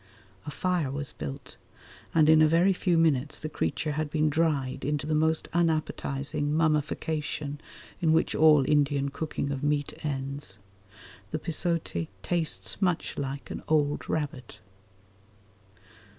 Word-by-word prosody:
A -, -, -2 dB
fire 175 Hz, -1 st, 0 dB
was 140 Hz, +1 st, -4 dB
built, 70 Hz, -3 st, -7 dB, 0.5 s
and 155 Hz, -2 st, +4 dB
in 160 Hz, 0 st, +7 dB
a 155 Hz, -, +7 dB
very 170 Hz, +5 st, +4 dB
few 180 Hz, -2 st, +1 dB
minutes 150 Hz, -3 st, +2 dB
the 155 Hz, -, -4 dB
creature 150 Hz, -, -1 dB
had 155 Hz, 0 st, -2 dB
been 155 Hz, 0 st, +1 dB
dried 145 Hz, -4 st, 0 dB
into 145 Hz, +1 st, -1 dB
that 155 Hz, -, -1 dB
most 160 Hz, +1 st, +2 dB
unappetising 150 Hz, -3 st, 0 dB
mummification 150 Hz, -1 st, -1 dB, 0.4 s
in 160 Hz, -2 st, +3 dB
which 160 Hz, +1 st, +2 dB
all 150 Hz, -3 st, +6 dB
Indian 145 Hz, -2 st, +2 dB
cooking 145 Hz, -1 st, -3 dB
of 135 Hz, -1 st, -3 dB
meat 145 Hz, -1 st, 0 dB
ends. 140 Hz, -7 st, -3 dB, 0.7 s
The 155 Hz, -, -2 dB
pisote 165 Hz, -, -2 dB, 0.2 s
tastes 170 Hz, -, -2 dB
much 180 Hz, -4 st, 0 dB
like 140 Hz, 0 st, -4 dB
an -, -, -5 dB
old 145 Hz, -2 st, +1 dB
rabbit. 150 Hz, -4 st, -3 dB
150 Hz, 135 wpm, -28 LUFS, 140-160 Hz, 0.7 s, in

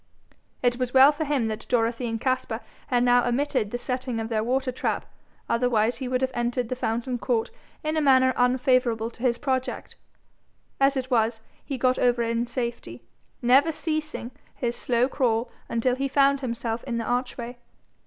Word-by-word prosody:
It 245 Hz, -1 st, +2 dB
was 250 Hz, 0 st, -2 dB
well 265 Hz, +2 st, +9 dB
for 305 Hz, +1 st, -3 dB
him 280 Hz, -5 st, 0 dB
that 220 Hz, -1 st, -4 dB
Dorothy 235 Hz, +1 st, +1 dB
and 225 Hz, -1 st, -3 dB
Caspar 255 Hz, -2 st, -1 dB, 0.3 s
had 245 Hz, -1 st, +2 dB
now 245 Hz, 0 st, +5 dB
omitted 250 Hz, -3 st, 0 dB
the 245 Hz, -, -3 dB
setting 250 Hz, -1 st, -3 dB
of 225 Hz, 0 st, -4 dB
their 215 Hz, -2 st, 0 dB
water 260 Hz, +2 st, 0 dB
trap, 245 Hz, -, -2 dB, 0.4 s
otherwise 230 Hz, -1 st, +1 dB
he 260 Hz, -, -4 dB
would 255 Hz, 0 st, 0 dB
have 260 Hz, 0 st, 0 dB
entered 240 Hz, 0 st, -1 dB
the 255 Hz, -, -1 dB
fountain 240 Hz, +1 st, -2 dB
court 230 Hz, -2 st, 0 dB, 0.3 s
in 310 Hz, +1 st, -1 dB
a 310 Hz, -, +2 dB
manner 260 Hz, -2 st, +5 dB
unfavourable 245 Hz, -2 st, +2 dB
to 235 Hz, -, -17 dB
his 245 Hz, -2 st, +2 dB
project. 260 Hz, -1 st, -3 dB, 0.8 s
As 275 Hz, 0 st, +3 dB
it 260 Hz, 0 st, -3 dB
was, 225 Hz, -1 st, +2 dB, 0.2 s
he 275 Hz, -, -4 dB
got 255 Hz, +1 st, +2 dB
over 245 Hz, -1 st, +2 dB
in 230 Hz, +1 st, -1 dB
safety, 235 Hz, -, -5 dB, 0.4 s
never 270 Hz, +6 st, +5 dB
ceasing 310 Hz, -5 st, -3 dB, 0.2 s
his 240 Hz, -3 st, -2 dB
slow 245 Hz, 0 st, +1 dB
crawl 240 Hz, -3 st, 0 dB, 0.2 s
until 235 Hz, +2 st, +1 dB
he 275 Hz, +1 st, -1 dB
found 275 Hz, 0 st, +3 dB
himself 235 Hz, -2 st, -3 dB
in 240 Hz, -3 st, -2 dB
the 230 Hz, -, -2 dB
archway. 245 Hz, 0 st, -3 dB
245 Hz, 175 wpm, -25 LUFS, 235-260 Hz, 0.8 s, well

